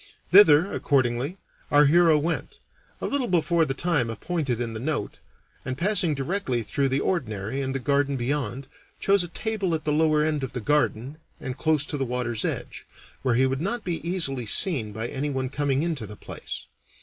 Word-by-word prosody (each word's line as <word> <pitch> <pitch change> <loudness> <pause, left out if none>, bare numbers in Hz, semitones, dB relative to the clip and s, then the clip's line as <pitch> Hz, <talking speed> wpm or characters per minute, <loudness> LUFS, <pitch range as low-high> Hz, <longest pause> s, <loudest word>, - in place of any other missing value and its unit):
Thither, 180 -2 +7
accordingly, 135 +4 0 0.3
our 145 0 +6
hero 165 +1 +5
went, 160 +3 -2 0.4
a - - -2
little 275 -3 -1
before 170 -1 +2
the 135 -2 -3
time 145 -6 +1
appointed 130 - -2
in 115 -2 -3
the 110 - -5
note, 140 -4 -3 0.4
and 130 0 -4
passing 180 -2 +2
directly 135 - -2
through 135 +5 0
the 135 +1 +1
Ordinary 120 - -2
and 135 0 -3
the - - 0
garden 140 +1 +1
beyond, 130 0 -2 0.3
chose 200 -2 +3
a - - -5
table 195 -1 -2
at 155 - -4
the 150 - +1
lower 155 0 +3
end 155 -2 0
of 130 - -4
the 125 - -3
garden 145 +1 0 0.2
and 130 -1 -5
close 155 -1 +1
to 145 - -4
the - - +1
water's 120 -3 -2
edge, - - -4 0.3
where 125 -3 +1
he 130 +2 +4
would 135 +1 -1
not 225 +5 -2
be 175 -2 -2
easily 150 - -2
seen 125 - +2
by 110 +3 -4
anyone 135 -1 -2
coming 140 +1 0
into 155 -10 -3
the 105 - -9
place. - - -8
145 Hz, 185 wpm, -25 LUFS, 130-165 Hz, 0.4 s, Thither